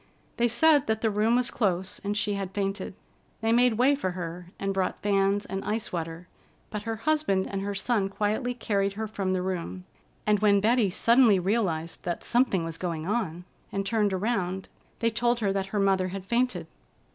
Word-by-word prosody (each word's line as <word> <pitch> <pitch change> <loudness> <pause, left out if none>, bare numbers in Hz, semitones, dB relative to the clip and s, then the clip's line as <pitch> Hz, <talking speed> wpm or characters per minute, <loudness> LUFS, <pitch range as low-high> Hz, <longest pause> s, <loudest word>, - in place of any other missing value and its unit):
They 240 0 +3
said 290 +4 +4
that 220 -1 0
the 225 - +2
room 215 +3 +2
was 250 0 +1
close, 190 -4 -1
and 205 +1 -1
she 205 0 0
had 195 -1 -4
fainted. 195 -1 -2 0.5
They 225 0 +1
made 240 0 +4
way 260 +4 +5
for 225 -11 -2
her 175 0 -6
and 195 0 -2
brought 190 -1 -2
fans 200 0 +2
and 195 +1 -4
ice 215 -1 -3
water, 165 +1 -4 0.4
but 210 - -3
her 225 - -1
husband 250 -6 +1
and 195 -1 -3
her 200 0 -3
son 200 -1 0
quietly 215 +5 -1
carried 200 -4 0
her 220 +2 -3
from 195 -3 -2
the 185 -1 0
room, 185 0 -4 0.4
and 210 -1 +3
when 205 -1 +4
Betty 220 0 +3
suddenly 230 +2 +5
realized 180 -4 -1
that 175 -1 -3
something 235 -8 +2
was 165 0 -5
going 165 -3 -3
on, 180 -5 -2 0.3
and 195 0 -2
turned 210 -1 +1
around, 190 -2 -1 0.3
they 230 -1 +1
told 240 +1 +1
her 200 -3 +1
that 195 -1 -1
her 205 +1 -2
mother 195 -2 +2
had 190 0 -6
fainted. 235 -6 0
200 Hz, 190 wpm, -27 LUFS, 185-225 Hz, 0.5 s, way